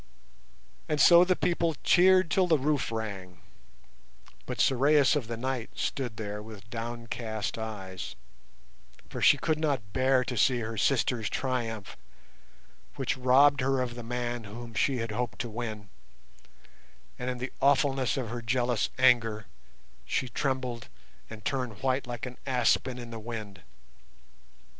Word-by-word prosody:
And 150 -1 0
so 175 +2 +8
the 185 0 +2
people 170 -2 0
cheered 185 -1 +5
till 185 -1 +3
the 160 -3 +4
roof 145 -2 0
rang; 100 -5 -5 1.1
but - - -5
Sorais 140 +2 +4
of 135 -6 -2
the 115 0 -4
Night 130 -1 -3
stood 125 -6 -3
there 105 -1 -5
with 105 -1 -11
downcast 115 -2 -4
eyes, 95 -5 -6 0.9
for - - -6
she - - +6
could 155 -1 -1
not 135 -10 -1
bear 130 0 +3
to 125 0 -4
see 120 +2 +3
her 110 0 -4
sister's 115 -1 +1
triumph, 115 -6 -3 1.0
which 135 - -1
robbed 135 +2 +5
her 135 0 +1
of 125 -1 -2
the 120 - -7
man 120 0 -4
whom 115 +3 -9
she 130 +5 +1
had 115 -2 -3
hoped 120 +2 -3
to 120 - -5
win, 110 -3 -5 1.3
and 125 0 -3
in 125 - -3
the 125 +1 -5
awfulness 135 -1 +2
of 125 -4 -3
her 120 0 -5
jealous 120 0 0
anger 115 -5 +3 0.6
she 130 - -1
trembled 125 -3 -3 0.4
and 110 -1 -10
turned 125 -6 -3
white 130 0 0
like 120 -1 -5
an 125 -1 -8
aspen 125 0 +1
in 120 -1 -8
the 115 - -6
wind. 105 -5 -7
120 Hz, 145 wpm, -29 LUFS, 110-135 Hz, 1.3 s, so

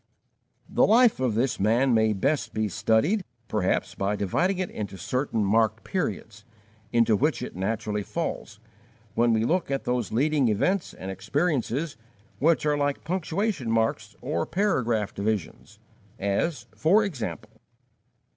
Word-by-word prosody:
The - - +2
life 230 - +5
of 125 -5 0
this 120 +3 0
man 120 +6 +3
may 110 -1 +3
best 135 +9 -1
be 110 0 +1
studied, 110 - +1 0.2
perhaps, 105 -4 0
by 100 +2 -1
dividing 175 - 0
it 185 -1 -2
into 100 -2 -5
certain 115 - -1
marked 110 +2 +2
periods, 110 - -3 0.5
into 115 -2 +4
which 130 +1 0
it - - -7
naturally 105 +2 -2
falls, - - -4 0.5
when 120 +1 +3
we 110 0 +2
look 180 +4 0
at 135 -1 -1
those 125 -2 -1
leading 140 +3 +2
events 170 - 0
and 95 +1 -6
experiences 140 - -1 0.4
which 160 +1 +3
are 150 -1 +2
like 145 0 -1
punctuation 180 - -1
marks 115 0 0
or 85 - -2
paragraph 120 - 0
divisions, 105 -2 -3 0.4
as, 100 - -1
for 200 +8 +4
example: 120 - -5
1. 110 - -28
120 Hz, 140 wpm, -26 LUFS, 110-155 Hz, 0.5 s, life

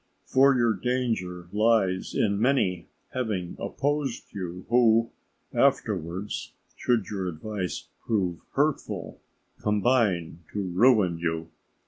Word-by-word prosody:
For 135 +1 +5
your 120 -2 +3
danger 110 -6 -2
lies 105 -3 +2
in 100 -1 +2
many 95 - +2 0.3
having 105 -9 -2
opposed 140 +5 -2
you, 90 -2 -6
who 115 -1 +4 0.4
afterwards, 100 - 0 0.2
should 120 -5 +1
your 95 -3 -2
advice 90 +2 -4 0.2
prove 95 -7 0
hurtful, - - -1 0.4
combine 105 -6 +1
to 105 - -2
ruin 95 -2 +3
you. 80 -1 -2
105 Hz, 100 wpm, -27 LUFS, 90-120 Hz, 0.4 s, For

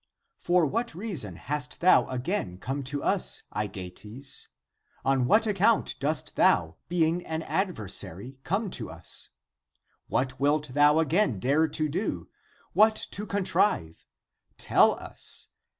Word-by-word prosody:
For 175 -1 +3
what 230 - -2
reason 165 - -3
hast 145 - -4
thou 185 - +5
again 125 - -3
come 135 +8 -4
to 140 +2 -3
us, 60 0 +2
Aegeates? 105 +5 -4 0.6
On 135 -2 +2
what 220 - +4
account 210 +2 +3
(p. - - -3
30) - - -11
dost 150 +3 -2
thou, 80 -1 +3
being 170 0 +1
an 160 0 -3
adversary, 130 - -2
come 195 +6 -1
to - - -3
us? - - -4 0.8
What 130 +2 -1
wilt 145 +1 +1
thou 145 +3 +4
again 160 - +2
dare 145 +9 +2
to 155 0 -1
do, 170 +9 -3 0.4
what 215 +1 +5 0.2
to 210 +1 -5
contrive? 185 - 0 0.5
Tell - - +4
us. - - -4
145 Hz, 135 wpm, -27 LUFS, 125-180 Hz, 0.8 s, thou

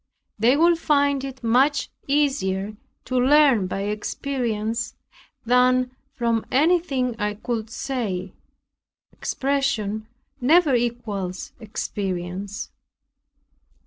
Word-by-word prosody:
They 245 +6 +4
will 340 +2 +5
find 285 -4 +2
it 265 -2 -7
much 260 +6 +2 0.2
easier 215 -9 0 0.3
to 255 -1 0
learn 265 -6 +5
by 195 - -3
experience 225 +1 -2 0.5
than 250 +1 +3 0.2
from 230 -2 +1
anything 280 -5 +2
I 210 -1 -1
could 225 0 -3
say; 210 -7 -3 0.8
expression 235 -7 -1 0.3
never 300 +3 +4
equals 225 -6 -2
experience. 195 -2 -4
240 Hz, 85 wpm, -23 LUFS, 210-275 Hz, 0.8 s, will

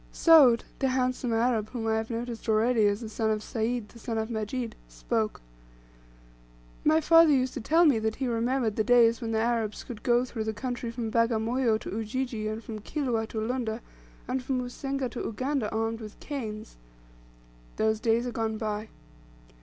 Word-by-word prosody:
Soud, 285 -8 +6 0.2
the 270 - +2
handsome 255 -1 0
Arab 225 -2 +1
whom 235 -3 -4
I 220 0 +1
have 220 0 -3
noticed 235 -1 -5
already 220 0 +3
as 205 +2 0
the 225 - -5
son 220 0 -1
of 215 -1 -1
Sayd 230 -1 -2
the 235 - -15
son 225 0 -3
of 220 +1 -2
Majid, 225 +2 -3
spoke: - - -2 1.4
"My 315 +1 +4
father 330 +1 +6
used 260 -3 +2
to 265 - -5
tell 325 +9 +4
me 275 -8 +4
that 220 0 -1
he 265 - -2
remembered 235 -1 0
the 220 - +2
days 235 0 +4
when 230 - -3
the 225 - 0
Arabs 225 -2 -1
could 230 -4 -8
go 240 0 +3
through 225 -3 -5
the 220 0 -3
country 245 +1 -4
from 230 -1 -4
Bagamoyo 230 +1 +2
to - - -6
Ujiji, 225 0 -3
and 215 +1 -4
from 215 -1 -6
Kilwa 235 -2 -2
to 220 - -4
Lunda, 230 0 -2 0.5
and 255 +1 -1
from 255 0 -1
Usenga 270 +2 -3
to 240 - -6
Uganda 255 +1 -2
armed 225 +1 -1
with 215 -1 -10
canes. 220 - -6 1.0
Those 220 0 +1
days 230 +1 +1
are 245 - -3
gone 220 -1 -2
by. 215 0 -3
230 Hz, 185 wpm, -28 LUFS, 220-255 Hz, 1.4 s, Soud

